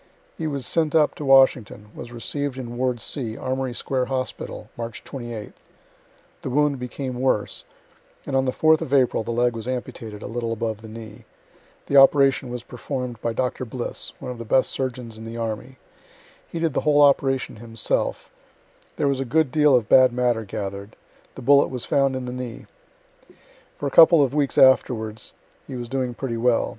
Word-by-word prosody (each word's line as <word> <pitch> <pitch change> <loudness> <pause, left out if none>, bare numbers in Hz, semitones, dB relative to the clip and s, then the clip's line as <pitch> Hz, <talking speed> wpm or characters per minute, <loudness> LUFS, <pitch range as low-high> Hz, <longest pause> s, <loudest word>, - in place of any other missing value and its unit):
He 160 - -3
was 140 -4 -4
sent 160 0 0
up 155 -2 +4
to 150 - -7
Washington, 130 -6 +3
was 120 - -9
receiv'd 135 +3 -4
in 120 -2 -6
ward 125 -1 -1
C, 115 -3 -4
Armory 130 -1 -3
square 130 0 -1
hospital, 130 0 -4
March 115 -1 -6
28th 120 -5 -8 0.8
the - - -4
wound 145 +1 +1
became 125 0 -5
worse, 130 -6 0 0.6
and 135 - -3
on 135 0 +2
the 130 - +1
4th 155 +3 +3
of 140 - 0
April 130 -4 +3
the 110 - -7
leg 120 0 +1
was 115 +1 -6
amputated 120 -4 -5
a - - -6
little 115 0 -3
above 110 -1 -3
the 110 - -10
knee 110 -1 -10 0.6
the 140 - +2
operation 135 -1 +5
was 120 -1 -5
perform' 125 0 -5
d 115 - -17
by 115 - -1
Dr. 125 +2 -2
Bliss, 125 0 -5
one 125 - -6
of 125 - -8
the - - -5
best 130 +4 +2
surgeons 125 -4 -4
in 110 - -9
the 115 +1 -7
army 115 +3 -5 0.7
he - - -6
did 165 -3 0
the - - 0
whole 145 -1 +4
operation 135 -4 +2
himself 115 0 -2 0.6
there 145 - 0
was 140 -1 0
a - - 0
good 135 +2 +1
deal 150 -2 +4
of 120 -4 +1
bad 130 -1 +6
matter 120 -2 0
gather'd 100 +1 -6 0.4
the - - -9
bullet 140 +3 +5
was 125 -2 -5
found 135 -1 +2
in 130 -1 -4
the 125 - -5
knee. 125 -2 -7 1.1
For - - -5
a 140 - -1
couple 165 -1 +7
of 135 -1 -1
weeks 145 -2 0
afterwards 110 -4 +3 0.3
he 135 - -7
was 120 -1 -5
doing 130 -1 -2
pretty 120 -3 -3
well. 120 0 +2
125 Hz, 190 wpm, -23 LUFS, 115-135 Hz, 1.1 s, couple